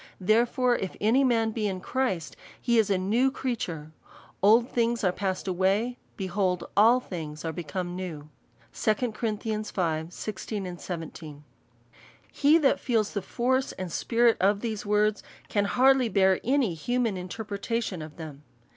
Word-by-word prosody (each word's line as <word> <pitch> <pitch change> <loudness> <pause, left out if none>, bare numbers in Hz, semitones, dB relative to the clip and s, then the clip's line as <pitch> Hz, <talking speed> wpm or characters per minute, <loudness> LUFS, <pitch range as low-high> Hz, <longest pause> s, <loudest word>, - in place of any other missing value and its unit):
Therefore 240 +5 +2
if 190 - -4
any 230 +6 +3
man 225 -3 +2
be 215 -1 -1
in 190 -2 -3
Christ, 190 -7 -2 0.2
he 235 -2 +2
is 215 - +2
a 195 - +2
new 220 +8 +2
creature: 185 - -4 0.5
old 225 +5 +5
things 235 -2 0
are 185 - +3
passed 190 0 -3
away; 195 +7 +1 0.2
behold 185 -1 -1
all 230 +5 +6
things 160 -9 -7
are 165 - -1
become 175 +2 -4
new." 165 -5 -6 0.5
2 215 - +1 0.2
Cor. 220 +1 -2
v. 200 -7 -2
16. 175 -6 -6 0.9
He 295 +3 +4
that 285 -3 +3
feels 225 -5 0
the 200 - -1
force 260 +6 0
and 185 -2 -6
spirit 235 +3 +2
of 200 +2 +2
these 220 -3 -4
words, 210 0 +2 0.3
can 205 -1 +1
hardly 260 +2 +4
bear 190 -2 +3
any 255 -6 +2
human 230 +6 -1
interpretation 200 +1 -4
of 155 -1 -9
them. 155 -4 -8
205 Hz, 145 wpm, -27 LUFS, 180-235 Hz, 0.9 s, all